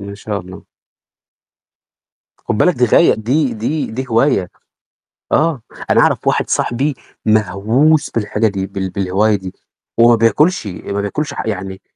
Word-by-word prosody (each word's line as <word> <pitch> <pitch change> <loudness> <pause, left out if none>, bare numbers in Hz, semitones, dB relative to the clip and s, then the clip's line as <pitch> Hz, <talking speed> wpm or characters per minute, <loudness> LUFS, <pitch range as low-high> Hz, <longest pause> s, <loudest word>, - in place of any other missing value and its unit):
إن 100 0 -8
شاء 105 0 -4
الله. 90 +1 -12 1.8
خُدّ - - -3
بالَك 180 +9 +3
دي 125 - +2
غايّة 115 - +4
دي 125 +4 0
دي 140 +8 -2
دي 130 +4 -4
هواية. 115 -6 +2 0.8
آه، 155 -5 +1 0.3
أنا - - +4
أعرف - - +1
واحد - - +1
صاحبي 135 +4 0 0.3
مهووس 110 - +2
بالحاجة 110 0 0
دي، 95 -2 -3
بال 95 -1 -4
بالهواية 100 +3 +1
دي. 95 -2 -6 0.5
هو 115 +1 +7
ما 120 - +6
بياكُلّشي، 115 - +2 0.2
ما 100 - -1
بياكُلّشي 145 +10 -3
ح - - -4
يعني، 95 -2 -5
110 Hz, 145 wpm, -16 LUFS, 100-130 Hz, 1.8 s, هو